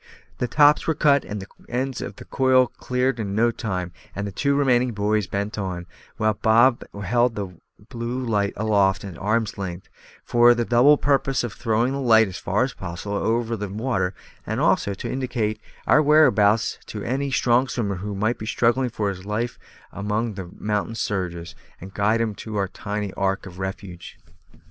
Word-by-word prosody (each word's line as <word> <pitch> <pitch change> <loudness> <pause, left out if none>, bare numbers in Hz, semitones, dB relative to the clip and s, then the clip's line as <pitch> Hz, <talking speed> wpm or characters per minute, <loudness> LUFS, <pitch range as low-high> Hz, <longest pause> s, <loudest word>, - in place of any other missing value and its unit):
The 125 - 0
stops 145 +4 +4
were 160 - +2
cut 140 -1 +4
and 105 0 -5
the 95 - -7 0.2
ends 130 +1 -2
of - - -6
the - - -12
coil 130 -1 +3
cleared 125 0 -2
in 100 -2 -3
no 120 +2 +3
time, 90 -6 -4 0.2
and 100 - -3
the 100 - -4
two 140 +8 0
remaining 125 -3 +2
buoys 105 -1 0
bent 100 +2 -3
on, 90 -3 -4 0.3
while 110 0 +2
Bob 115 +4 +4 0.2
held 120 +3 +2
the 100 -2 -4 0.4
blue 120 +1 -4
light 105 -3 0
aloft 100 -3 +2
at 95 -3 -7
arm's 110 +1 -1
length, 95 -2 -6 0.3
for 120 0 +5
the 120 0 0
double 125 +6 +5
purpose 135 -2 +1
of 120 - -4
throwing 115 +3 0
the 140 - -2
light 110 -3 +5
as 95 -2 -7
far 105 +6 +1
as 130 - -2
possible 95 +3 -6
over 115 +2 0
the 105 -2 -5
water, 100 -4 -1 0.3
and - - -3
also 100 - +2
to - - -6
indicate 115 -5 -2 0.2
our 150 - +5
whereabouts 115 -9 +4
to 105 - -6
any 135 +3 -1
strong 125 -1 +2
swimmer 105 -7 -2
who 100 +2 -5
might 110 +5 0
be 110 - -6
struggling 120 +2 +2
for 105 -3 -2
his 95 -2 -6
life 110 +4 -3 0.3
among 105 +3 -2
the 95 -3 -7
mountain 105 +2 -2
surges, 90 -5 -3 0.3
and 95 +2 -10
to - - -15
guide 105 +3 +2
him 110 -2 -1
to 110 +1 -8
our 100 -1 0
tiny 105 +1 -4
ark 95 0 -1
of 95 -1 -10
refuge. 95 0 -7
110 Hz, 185 wpm, -23 LUFS, 100-120 Hz, 0.4 s, for